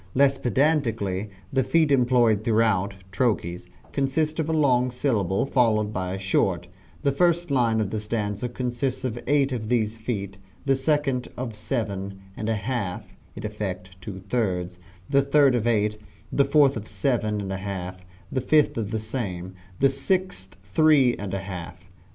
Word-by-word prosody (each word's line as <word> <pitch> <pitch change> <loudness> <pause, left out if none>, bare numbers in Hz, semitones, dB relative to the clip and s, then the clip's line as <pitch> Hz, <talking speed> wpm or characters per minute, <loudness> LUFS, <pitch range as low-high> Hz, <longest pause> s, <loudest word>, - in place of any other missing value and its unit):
Less 135 0 +4
pedantically 115 -8 +1 0.2
the 130 0 +3
feet 160 0 +3
employed 120 -5 +4
throughout 110 -4 +2 0.2
(trochees) 90 -5 -1 0.2
consist 155 +4 0
of 160 0 0
a - - +1
long 130 -5 +3
syllable 110 -7 0
followed 110 -6 +2
by 90 -1 -2
a - - -4
short, 95 -2 +1 0.4
the 140 - +3
first 170 +2 +2
line 115 -4 +3
of 105 -3 -1
the 110 - -1
stanza 105 +2 -2
consists 125 +2 -2
of 120 -2 -2
eight 140 0 +3
of 110 -4 -3
these 115 -2 0
feet, 100 -4 -4 0.3
the 135 -1 +3
second 135 -2 0
of 120 -3 -4
seven 100 -4 -3 0.2
and 110 - -3
a 110 - +2
half 105 -4 -4 0.2
(in - - -6
effect 95 -3 -5
two 95 0 -7
thirds), 90 -6 -1 0.3
the 140 -1 +4
third 140 -1 +4
of 120 -2 0
eight, 105 -2 +1 0.3
the 140 - +3
fourth 140 -1 +4
of 110 -1 -5
seven 105 0 0
and 95 -1 -3
a - - -2
half, 95 -2 -5 0.3
the 130 - 0
fifth 150 +3 +3
the 110 0 -2
same, 100 -6 -4 0.3
the 135 - +5
sixth 185 - -1
three 135 +4 +4
and 100 -1 -4
a 95 - -3
half. 90 -2 -8
115 Hz, 165 wpm, -25 LUFS, 100-135 Hz, 0.4 s, the